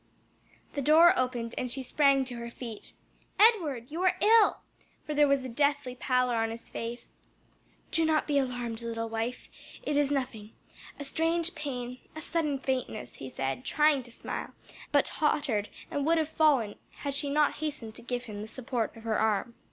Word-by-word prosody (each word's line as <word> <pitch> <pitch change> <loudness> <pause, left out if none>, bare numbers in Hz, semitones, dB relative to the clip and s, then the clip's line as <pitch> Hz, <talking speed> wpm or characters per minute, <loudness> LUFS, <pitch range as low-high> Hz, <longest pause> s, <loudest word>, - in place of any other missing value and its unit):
The 285 - -2
door 320 +5 +7
opened 245 -4 -1
and 250 - -3
she 265 +1 -3
sprang 275 0 +3
to 250 -2 -6
her 235 0 -5
feet. 235 -3 -8 0.5
"Edward! 315 - +4
you 330 +3 -3
are 370 -1 +3
ill!" 440 0 +5 0.4
for 305 - -3
there 295 0 +5
was 275 -2 +2
a - - -2
deathly 285 +1 +1
pallor 250 -1 +1
on 225 0 +1
his 230 +1 -7
face. 235 +1 -6 0.7
"Do 330 - +2
not 315 -1 +2
be 290 -2 +2
alarmed, 245 -3 -3
little 230 -1 -3
wife; 225 +2 -3 0.4
it 295 - 0
is 290 -1 +3
nothing 245 -6 -3 0.5
a - - -4
strange 330 +4 0
pain, 255 -5 -5 0.2
a 315 - -6
sudden 305 -4 0
faintness," 260 -5 -3
he 135 - -7
said, 135 - -3
trying 300 0 +3
to 240 -1 -14
smile, - - -6 0.4
but - - +4
tottered 275 -9 0 0.2
and 285 - -1
would 330 +1 +4
have 315 -1 +1
fallen 280 -10 +2 0.3
had 280 - -1
she 285 +1 -2
not 295 +1 +2
hastened 290 -8 -4
to - - -11
give 245 +1 -3
him 210 -3 -7
the 215 - -6
support 235 -1 -3
of 225 - -12
her 225 -1 0
arm. 220 +2 +1
260 Hz, 185 wpm, -29 LUFS, 235-300 Hz, 0.7 s, door